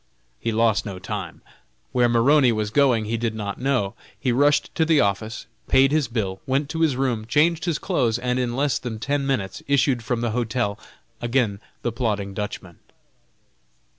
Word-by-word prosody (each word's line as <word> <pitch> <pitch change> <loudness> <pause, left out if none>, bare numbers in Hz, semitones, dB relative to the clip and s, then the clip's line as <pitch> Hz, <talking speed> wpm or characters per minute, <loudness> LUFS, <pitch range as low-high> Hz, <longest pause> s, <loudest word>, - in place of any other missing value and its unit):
He 115 - -1
lost 110 -1 +2
no 100 -3 -6
time. 95 -2 -6 0.5
Where 125 -1 +3
Maroney 125 +3 +4
was 110 -1 -2
going 125 -5 +3
he 115 +2 -1
did 115 -1 -2
not 100 -2 -4
know. 125 -7 0 0.3
He 130 - 0
rushed 145 +4 +2
to 160 - +2
the 160 -2 +3
office, 110 +2 -1 0.2
paid 135 +1 +4
his 150 -4 +2
bill, 100 -5 -3
went 140 +2 0
to 165 0 -3
his 155 -5 +3
room, 125 -5 -1
changed 160 +6 +2
his 170 -4 0
clothes, 125 - 0
and 125 +1 -1
in 120 -1 -1
less 140 +1 +1
than 120 -3 -5
ten 140 +4 -1
minutes 100 -9 -2
issued 135 -3 +2
from 115 +1 -1
the 120 -1 0
hotel, 115 -2 -1 0.4
again 120 -4 0 0.2
the 120 - 0
plodding 105 -4 -2
Dutchman. 95 -4 -6
120 Hz, 175 wpm, -23 LUFS, 110-135 Hz, 0.5 s, Maroney